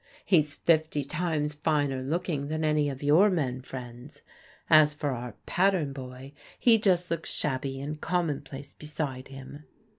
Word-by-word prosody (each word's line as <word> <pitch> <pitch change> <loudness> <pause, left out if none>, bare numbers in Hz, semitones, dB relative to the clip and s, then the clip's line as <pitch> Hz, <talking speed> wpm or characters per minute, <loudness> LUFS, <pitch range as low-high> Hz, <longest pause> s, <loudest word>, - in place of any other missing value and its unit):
" - - -26
He's 155 -6 +3
fifty 155 -3 +2
times 150 0 -1
finer 145 -3 0
looking 145 0 -2
than 155 +1 -1
any 150 -1 +2
of 135 0 -7
your 160 +9 +6
men 135 -9 -1
friends. 125 +1 -9 0.4
As 155 -2 +6
for 145 -1 -2
our 120 -2 -5
pattern 180 -7 +1
boy, 130 +1 -9 0.3
he 230 -2 +5
just 180 -4 +2
looks 165 -1 -2
shabby 135 -1 -2
and 150 +2 -5
conmionplace 145 -5 -3
beside 150 -4 -4
him." 135 +2 -11
150 Hz, 150 wpm, -28 LUFS, 135-160 Hz, 0.4 s, your